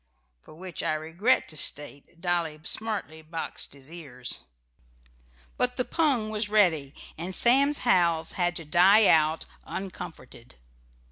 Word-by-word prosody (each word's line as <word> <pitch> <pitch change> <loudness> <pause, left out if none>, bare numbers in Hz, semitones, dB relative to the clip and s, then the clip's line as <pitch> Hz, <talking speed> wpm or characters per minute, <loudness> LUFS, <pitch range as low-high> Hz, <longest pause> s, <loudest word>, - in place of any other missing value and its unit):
For - - -16
which 180 +1 -7
I - - 0
regret 165 +10 +1
to 155 - -4
state 145 +2 -3
Dolly 170 -3 -1
smartly 205 -6 -2
boxed 160 -2 -5
his 140 +2 -12
ears. 135 -8 -4 1.1
But 250 0 0
the 250 - -1
pung 265 -10 0
was 210 0 -1
ready, 165 -10 +2 0.2
and 180 +3 -2
Sam's 275 +4 +5
howls 170 -7 +2
had 175 -1 -1
to 165 - -6
die 190 +7 +5
out 155 -2 +3 0.2
uncomforted. 165 - -9
175 Hz, 130 wpm, -26 LUFS, 155-210 Hz, 1.1 s, Sam's